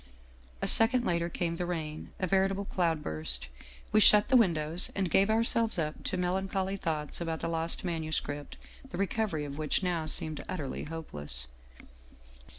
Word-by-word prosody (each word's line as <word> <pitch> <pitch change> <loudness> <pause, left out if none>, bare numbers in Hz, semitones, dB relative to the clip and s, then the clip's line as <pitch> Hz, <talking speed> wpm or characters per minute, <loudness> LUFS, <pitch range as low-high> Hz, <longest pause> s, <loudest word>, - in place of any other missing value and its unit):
" - - -27
A - - 0
second 245 +2 +4
later 170 0 0
came 170 -1 -3
the 180 - -2
rain, 155 -3 -5
a 185 - 0
veritable 195 +2 +1
cloud 165 -5 -1
burst. 65 -5 0 0.4
We 215 - +4
shut 210 0 +6
the 260 - +3
windows 170 -6 +5
and 190 -4 -1
gave 195 +5 +3
ourselves 225 -1 +3
up 155 -2 -3
to 185 - -1
melancholy 190 +2 -1
thoughts 155 -4 -3
about 165 -1 -3
the - - -2
lost 165 0 -1
manuscript, 155 -4 -4 0.3
the - - -7
recovery 195 -5 -1
of 140 +1 -7
which 155 +5 -1
now 170 -3 -1
seemed 155 0 +1
utterly 145 -7 -4
hopeless. 75 - -5
170 Hz, 160 wpm, -29 LUFS, 150-190 Hz, 0.4 s, shut